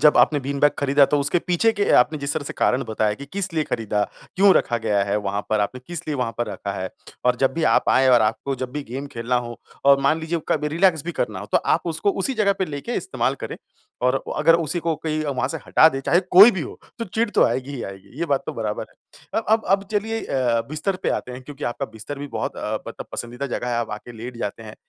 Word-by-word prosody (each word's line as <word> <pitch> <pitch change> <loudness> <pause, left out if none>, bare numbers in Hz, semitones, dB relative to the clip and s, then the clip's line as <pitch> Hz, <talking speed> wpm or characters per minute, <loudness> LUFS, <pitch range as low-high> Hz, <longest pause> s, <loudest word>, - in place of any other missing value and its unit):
जब 150 -1 +6
आपने 145 -2 +4
bean 140 +1 -3
bag 145 - +5
खरीदा 140 0 +4
तो 145 - +3
उसके 145 +5 +1
पीछे 180 +6 +2
के 205 -1 0
आपने 150 +5 0
जिस 140 0 -2
तरह 155 - -2
से - - -5
कारण 125 +2 +2
बताया 110 -1 0
कि 140 +5 -10
किस 190 -2 -3
लिए 155 - +1
खरीदा, 105 -5 -1 0.3
क्यों 195 0 +6
रखा 120 - +2
गया 100 -2 +1
है 100 +1 0
वहाँ 100 0 -2
पर 110 -1 +2
आपने, 125 +5 -2
किस 175 -1 -6
लिए 150 - 0
वहाँ 120 -3 -1
पर 120 - 0
रखा 100 - -5
है 95 -1 -4 0.4
और 125 -1 +3
जब 135 +1 +2
भी 165 - -2
आप - - +2
आए 130 0 +4
और 125 -2 +6
आपको 115 +5 -1
जब 130 0 -4
भी 150 - -3
गेम 135 +4 -5
खेलना 120 +2 -1
हो 120 0 -8 0.3
और 140 0 +6
मान 155 +4 +2
लीजिए 165 +1 -2
कभी 150 -1 +1
रिलैक्स 165 -1 +2
भी 175 - -3
करना 120 - -2
हो 100 - -7
तो - - +5
आप 165 +2 0
उसको 170 +5 0
उसी 270 - -1
जगह 210 -3 +3
पे 190 - +1
लेके 150 +9 -5
इस्तेमाल - - -1
करें - - -5 0.5
और 125 +2 +2
अगर 165 +2 +5
उसी 170 +1 0
को 165 0 0
कोई 155 0 -2
वहाँ 135 -2 -1
से 160 - -3
हटा 160 - +6
दे 135 -3 -3
चाहे 170 +6 +3
कोई 200 +6 +10
भी 190 -6 -3
हो - - -8 0.2
तो 230 - -2
चिढ़ 225 +3 -1
तो - - +4
आएगी 130 +2 -1
ही 125 - -5
आएगी। 100 +8 -10
ये 170 - -1
बात 140 -3 +1
तो - - -3
बराबर - - -3
है। - - -7
अ - - -13
अब 220 0 +3
अब 195 +1 +3
चलिए 225 +2 -1
अ, 120 -3 +1
बिस्तर 155 +6 -2
पे - - +1
आते 125 - -3
हैं 125 +1 -8
क्योंकि 145 +2 -8
आपका 125 +3 -2
बिस्तर 110 +6 -8
भी 145 - -5
बहुत - - -4
अ, - - -3
मतलब - - -8
पसंदीदा 120 +4 -4
जगह 125 -1 -3
है 120 - 0
आप 120 -1 -2
आके 115 +3 -7
लेट 120 +2 -8
जाते 115 0 -4
हैं। 110 -1 -10
140 Hz, 265 wpm, -23 LUFS, 120-165 Hz, 0.5 s, कोई